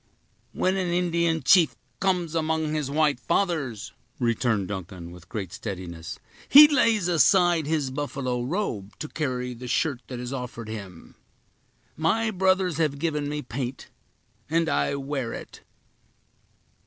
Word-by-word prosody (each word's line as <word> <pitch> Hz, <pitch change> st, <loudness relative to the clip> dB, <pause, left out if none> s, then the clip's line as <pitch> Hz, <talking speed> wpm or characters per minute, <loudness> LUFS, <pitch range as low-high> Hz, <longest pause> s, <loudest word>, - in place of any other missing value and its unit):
"When 185 Hz, +1 st, 0 dB
an 185 Hz, -2 st, -1 dB
Indian 170 Hz, -2 st, +1 dB
chief 170 Hz, +3 st, +5 dB, 0.2 s
comes 180 Hz, -4 st, 0 dB
among 160 Hz, -1 st, 0 dB
his 150 Hz, -3 st, -1 dB
white 150 Hz, -2 st, +2 dB
fathers," 155 Hz, -, -1 dB, 0.3 s
returned 115 Hz, -4 st, 0 dB
Duncan, 95 Hz, -3 st, -6 dB
with 90 Hz, 0 st, -14 dB
great 95 Hz, -5 st, -5 dB
steadiness, 90 Hz, -5 st, -6 dB, 0.3 s
"he 295 Hz, +2 st, +11 dB
lays 230 Hz, -, +2 dB
aside 175 Hz, 0 st, +4 dB
his 150 Hz, -4 st, 0 dB
buffalo 130 Hz, -3 st, -2 dB
robe, 125 Hz, -, -3 dB
to 155 Hz, -, -5 dB
carry 125 Hz, -5 st, -3 dB
the 125 Hz, +1 st, -9 dB
shirt 130 Hz, 0 st, 0 dB
that 125 Hz, -2 st, -6 dB
is 125 Hz, +2 st, -5 dB
offered 120 Hz, -4 st, -6 dB
him. 100 Hz, -6 st, -9 dB, 0.8 s
My 220 Hz, +9 st, +1 dB
brothers 185 Hz, -3 st, +2 dB
have 150 Hz, -3 st, +1 dB
given 150 Hz, -2 st, -1 dB
me 150 Hz, 0 st, -3 dB
paint 125 Hz, +1 st, -5 dB, 0.6 s
and 165 Hz, +1 st, +2 dB
I 140 Hz, -, +1 dB
wear 135 Hz, -3 st, -3 dB
it." -, -, -9 dB
145 Hz, 135 wpm, -26 LUFS, 120-170 Hz, 0.8 s, he